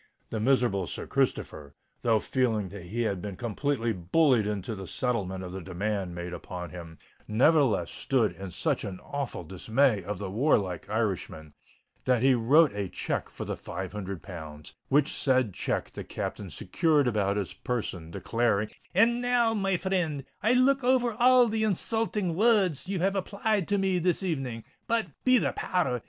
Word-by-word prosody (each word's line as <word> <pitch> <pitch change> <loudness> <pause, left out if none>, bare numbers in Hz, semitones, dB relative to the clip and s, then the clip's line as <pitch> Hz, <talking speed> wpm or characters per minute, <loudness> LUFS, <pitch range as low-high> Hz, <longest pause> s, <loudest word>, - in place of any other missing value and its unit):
The 110 - -2
miserable 115 -6 +2
Sir - - -6
Christopher, 70 -2 -2 0.3
though 115 -2 +3
feeling 110 -6 0
that 95 -2 -9
he 120 +5 -1
had 100 -5 -1
been 100 -1 -5
completely 120 +2 -1
bullied 110 - +3
into 105 +1 -3
the 95 -3 -7
settlement 95 -7 -2
of 90 - -6
the 95 +1 -6
demand 95 0 -3
made 90 0 -5
upon 90 -2 -7
him, 85 -2 -9 0.3
nevertheless 120 - +3
stood 125 -5 +1
in 95 -1 -7
such 85 - -1
awful 120 +4 -5
dismay 110 - +1
of 100 +2 -4
the 95 0 -5
warlike 100 - +1
Irishman, 95 -8 -2 0.5
that 125 -2 +2
he 135 0 +6
wrote 140 +6 +5
a 100 -2 -3
cheque - - -3
for - - -7
the - - -3
five 95 -1 -6
hundred 100 -3 -6
pounds, 80 -5 -9 0.2
which 145 +1 +3
said 130 -6 +2
cheque - - -2
the - - -7
Captain - - -5
secured 150 -5 +1
about 105 -3 +1
his 100 -3 -3
person, 95 -9 -4
exclaiming, 115 -3 0 0.3
"And 235 +5 +4
now, 245 -2 +2
my 195 -3 +1
frind, 175 -6 -1 0.2
I'll 230 +3 +3
look 270 +1 +4
over 245 -2 +3
all 250 +2 +5
the 220 0 0
insulting 210 -2 0
words 195 - +2
ye 195 - -1
have 195 +3 +1
applied 200 0 0
to 205 - +1
me 190 -2 +1
this 180 +2 +1
evening. 135 -10 -3 0.2
But, 230 -1 +1 0.2
be 255 0 +5
the - - 0
power 180 -6 0
r 125 - 0
s! - - -8
120 Hz, 175 wpm, -28 LUFS, -, 0.5 s, he